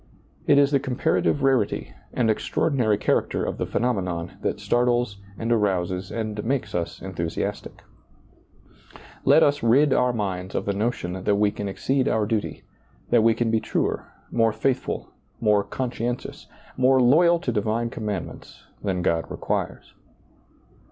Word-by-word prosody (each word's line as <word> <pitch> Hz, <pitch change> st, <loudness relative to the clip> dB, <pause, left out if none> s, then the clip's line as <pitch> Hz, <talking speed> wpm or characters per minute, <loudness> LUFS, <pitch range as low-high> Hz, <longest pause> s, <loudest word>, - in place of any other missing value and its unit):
It 145 Hz, -, +5 dB
is 140 Hz, 0 st, +5 dB
the 140 Hz, -, +3 dB
com 130 Hz, -2 st, -4 dB
parative 145 Hz, -1 st, +1 dB
rarity 125 Hz, -, +1 dB, 0.2 s
and 120 Hz, -3 st, +1 dB
extraordinary 110 Hz, 0 st, +1 dB
character -, -, 0 dB
of -, -, -4 dB
the -, -, -1 dB
phenomenon 90 Hz, -8 st, -1 dB
that -, -, -2 dB
startles 120 Hz, -3 st, +1 dB, 0.2 s
and 115 Hz, +1 st, -2 dB
arouses 95 Hz, -4 st, 0 dB
and 110 Hz, -2 st, -3 dB
makes 120 Hz, -3 st, -2 dB
us 85 Hz, -1 st, -3 dB
enthusiastic 85 Hz, -3 st, -4 dB, 1.4 s
Let -, -, +6 dB
us 145 Hz, 0 st, +2 dB
rid 130 Hz, +5 st, +4 dB
our 125 Hz, 0 st, +3 dB
minds 95 Hz, -5 st, -3 dB
of -, -, -1 dB
the 100 Hz, -, 0 dB
notion 95 Hz, -4 st, -2 dB
that 105 Hz, 0 st, +2 dB
we 105 Hz, 0 st, +2 dB
can 100 Hz, -1 st, -4 dB
exceed 130 Hz, +7 st, 0 dB
our 110 Hz, -1 st, +1 dB
duty, 110 Hz, -1 st, -2 dB, 0.5 s
that -, -, +5 dB
we 115 Hz, 0 st, +4 dB
can 115 Hz, -1 st, 0 dB
be 110 Hz, -, +3 dB
truer, -, -, -2 dB, 0.2 s
more 115 Hz, -1 st, +3 dB
faithful, 130 Hz, +4 st, -2 dB, 0.3 s
more 105 Hz, -2 st, +3 dB
conscientious, 120 Hz, +2 st, -4 dB, 0.3 s
more 130 Hz, +1 st, +4 dB
loyal 165 Hz, +8 st, +5 dB
to 150 Hz, -7 st, -3 dB
divine 110 Hz, +2 st, -1 dB
commandments 105 Hz, -6 st, -6 dB, 0.2 s
than 95 Hz, -3 st, -1 dB
God 80 Hz, -3 st, 0 dB
requires. -, -, -3 dB
110 Hz, 145 wpm, -24 LUFS, 100-125 Hz, 1.4 s, Let